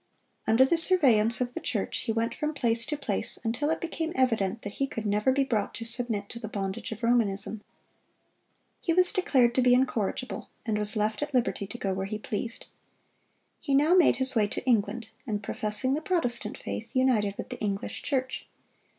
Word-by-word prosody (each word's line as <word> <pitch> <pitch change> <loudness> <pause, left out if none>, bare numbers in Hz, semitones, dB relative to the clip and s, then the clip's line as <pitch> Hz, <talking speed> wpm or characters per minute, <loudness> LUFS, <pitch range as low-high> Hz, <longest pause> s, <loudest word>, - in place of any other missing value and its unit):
Under 230 +4 +4
the 330 +5 +2
surveillance 250 - +6
of 245 0 -3
the - - -5
church 215 -5 -3
he - - -3
went 230 +1 -2
from 300 +3 -4
place 230 -3 0
to 300 - -3
place, 285 - +2
until 240 +6 -2
it 320 - -1
became 330 -1 -5
evident 225 -5 -1
that 205 - -7
he 275 - 0
could 225 -4 -7
never 210 +4 +1
be 275 +1 +1
brought 225 -6 -3
to 230 - -7
submit 230 -3 +4
to 235 - -8
the 220 - -7
bondage 200 +2 -5
of 220 +2 -9
Romanism. 220 -3 -1 1.2
He 335 - -1
was 365 +1 +10
declared 255 -10 +1
to 255 - +1
be 245 0 +4
incorrigible, 255 -1 -3 0.2
and 220 -3 -2
was 210 +1 0
left 215 +2 -2
at 290 -2 -4
liberty 235 -5 -1
to 240 - -9
go 195 -4 -3
where 190 +1 -4
he 215 +1 -5
pleased. 220 +2 -5 0.9
He 280 -4 -2
now 300 +5 +3
made 360 -7 +4
his 260 +1 +2
way 215 -4 +1
to 205 - -6
England, 225 -1 -1 0.2
and 210 -2 -4
professing 210 +5 +1
the 300 - -2
Protestant 315 -10 -2
faith, 230 +3 -7
united 230 -6 +1
with - - -7
the - - -7
English 200 +1 -4
Church. 260 -2 -3
235 Hz, 195 wpm, -26 LUFS, 210-265 Hz, 1.2 s, was